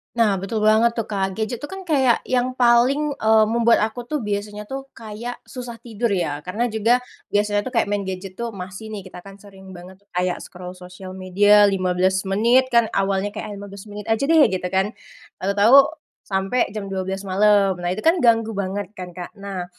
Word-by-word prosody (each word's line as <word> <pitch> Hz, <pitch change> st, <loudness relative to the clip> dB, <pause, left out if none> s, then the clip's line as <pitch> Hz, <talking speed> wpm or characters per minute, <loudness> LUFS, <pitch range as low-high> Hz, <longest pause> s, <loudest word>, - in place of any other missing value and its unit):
Nah 220 Hz, -4 st, +3 dB
betul 200 Hz, +4 st, -3 dB
banget 220 Hz, +2 st, +4 dB
tuh 230 Hz, -2 st, -4 dB
Kak, 195 Hz, -2 st, -1 dB
gadget 220 Hz, +4 st, -3 dB
tuh 290 Hz, -, -7 dB
kan 385 Hz, -, -7 dB
kayak 265 Hz, -6 st, +3 dB
yang 255 Hz, 0 st, +1 dB
paling, 255 Hz, +4 st, +3 dB
eee, 220 Hz, 0 st, +4 dB
membuat 235 Hz, 0 st, +3 dB
aku 225 Hz, +3 st, -2 dB
tuh 300 Hz, +2 st, -3 dB
biasanya 210 Hz, 0 st, -4 dB
tuh 270 Hz, 0 st, -5 dB
kayak 230 Hz, +2 st, -7 dB
susah 245 Hz, -3 st, -9 dB
tidur 230 Hz, -2 st, -2 dB
ya. 160 Hz, -6 st, -1 dB
Karena 220 Hz, +7 st, -1 dB
juga 225 Hz, +3 st, +2 dB, 0.3 s
biasanya 205 Hz, 0 st, +1 dB
tuh 260 Hz, -, -6 dB
kayak 230 Hz, -3 st, +1 dB
main 205 Hz, -1 st, -1 dB
gadget 185 Hz, 0 st, -6 dB
tuh 235 Hz, -1 st, -4 dB
masih 195 Hz, +3 st, -8 dB
nih, 205 Hz, -, -5 dB
kita 180 Hz, 0 st, -12 dB
kan 195 Hz, 0 st, -13 dB
sering 190 Hz, -2 st, -13 dB
banget 180 Hz, +1 st, -12 dB
tuh -, -, -51 dB
kayak 180 Hz, 0 st, 0 dB
scroll 180 Hz, +1 st, -10 dB
sosial 185 Hz, +1 st, -10 dB
media 205 Hz, +3 st, +5 dB
15 185 Hz, -1 st, +1 dB
menit 235 Hz, +6 st, +3 dB
kan 235 Hz, -2 st, +4 dB
awalnya 195 Hz, +1 st, 0 dB
kayak, -, -, -6 dB
ah -, -, -6 dB
15 200 Hz, +1 st, -10 dB
menit 205 Hz, 0 st, -8 dB
aja 225 Hz, -1 st, 0 dB
deh 325 Hz, -1 st, +6 dB
gitu 180 Hz, -1 st, -2 dB
kan, 190 Hz, +3 st, 0 dB, 0.5 s
tahu-tahu 200 Hz, +6 st, +5 dB, 0.5 s
sampai 195 Hz, +6 st, 0 dB
jam 205 Hz, 0 st, -6 dB
12:00 190 Hz, +1 st, -3 dB
malam. 200 Hz, 0 st, +3 dB
Nah 175 Hz, -, -1 dB
itu 185 Hz, +4 st, -3 dB
kan 335 Hz, +2 st, +4 dB
ganggu 225 Hz, -2 st, +3 dB
banget 200 Hz, 0 st, -4 dB
kan 180 Hz, -2 st, -9 dB
Kak, 180 Hz, +3 st, -7 dB
nah, 195 Hz, -3 st, -6 dB
205 Hz, 195 wpm, -22 LUFS, 190-230 Hz, 0.5 s, deh